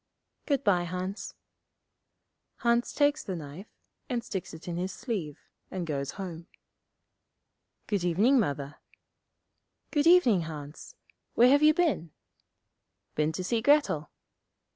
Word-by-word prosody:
'Good 280 -2 +1
bye, 180 -3 +3
Hans.' 185 +3 -5 1.2
Hans 235 0 +1
takes 290 0 +2
the 190 - -4
knife, 160 +5 -8 0.4
and 240 -3 -1
sticks 195 -6 -5
it 160 +1 -11
in 175 - -3
his 185 +2 -2
sleeve, 195 - -4 0.3
and 185 -2 -4
goes 140 -3 -3
home. 175 -3 -7 1.4
'Good 200 -4 -1
evening, 210 +10 +4
Mother.' 145 - -2 1.1
'Good 295 0 +2
evening, 295 - +6
Hans. 150 - -9 0.4
Where 245 +2 +6
have 285 +2 +5
you 305 0 +6
been?' 320 - +1 1.0
'Been 155 +1 +1
to 185 +3 -4
see 225 +4 0
Grettel.' 285 - +3
190 Hz, 120 wpm, -29 LUFS, 165-250 Hz, 1.4 s, evening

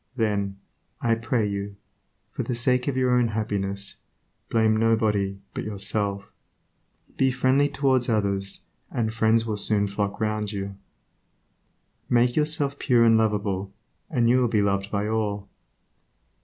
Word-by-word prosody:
Then, 100 -4 -1 0.4
I 115 - +2
pray 115 0 0
you, 100 0 -4 0.6
for - - -4
the 125 - -3
sake 125 +2 +1
of 135 -2 -1
your 130 -1 +2
own 125 -1 +3
happiness, 100 -3 -3 0.5
blame 110 -1 +3
nobody 110 -3 +1 0.2
but - - -4
yourself. 100 -1 -1 0.9
Be 135 - +3
friendly 130 +3 +2
towards 135 -3 +1
others, 100 -3 0 0.2
and 110 -2 -2
friends 115 0 +2
will 110 -2 -2
soon 105 0 +2
flock 100 0 -3
round 105 -1 -1
you. 100 -1 -5 1.3
Make 120 0 +3
yourself 150 -2 +1
pure 120 -3 +3
and 115 -1 +5
lovable, 100 -3 0 0.4
and 120 -7 +2
you 125 +2 +4
will 125 - +3
be 110 -2 +1
loved 100 0 0
by 105 0 -1
all. 105 -2 -2
110 Hz, 140 wpm, -25 LUFS, 100-120 Hz, 1.3 s, and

